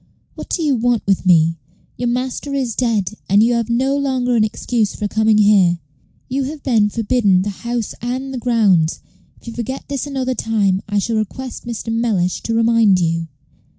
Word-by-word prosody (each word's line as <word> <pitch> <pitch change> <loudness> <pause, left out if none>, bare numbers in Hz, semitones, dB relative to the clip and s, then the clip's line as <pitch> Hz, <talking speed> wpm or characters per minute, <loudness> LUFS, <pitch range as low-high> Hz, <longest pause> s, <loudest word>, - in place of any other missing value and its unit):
"What - - -9
do 335 - -1
you 295 -3 +2
want 240 -1 0
with 195 -1 0
me? 165 -2 +4 0.4
Your 245 - -2
master 255 +3 -3
is 255 -4 -1
dead, 220 -6 0 0.2
and 200 +3 +5
you 240 +1 +3
have 235 -1 -1
no 260 +4 +1
longer 260 -3 0
an 220 - +4
excuse 215 0 -1
for 210 - -2
coming 220 +1 +2
here. 200 -5 +4 0.5
You 265 +1 -1
have 290 +1 -7
been 220 -6 +2
forbidden 210 -4 +2
the 205 - -3
house 235 +2 -4
and 260 +3 -3
the 255 - -3
grounds. 205 -10 +2 0.4
If - - -23
you - - -7
forget 245 +3 -5
this 280 0 -3
another 260 -2 -2
time, 205 -5 0
I 205 - 0
shall 225 +3 0
request 240 +4 -5
Mr. 230 -1 -4
Mellish 215 -6 0
to 230 - -2
remind 225 -4 +4
you." 165 -1 -1
230 Hz, 185 wpm, -18 LUFS, 205-250 Hz, 0.5 s, and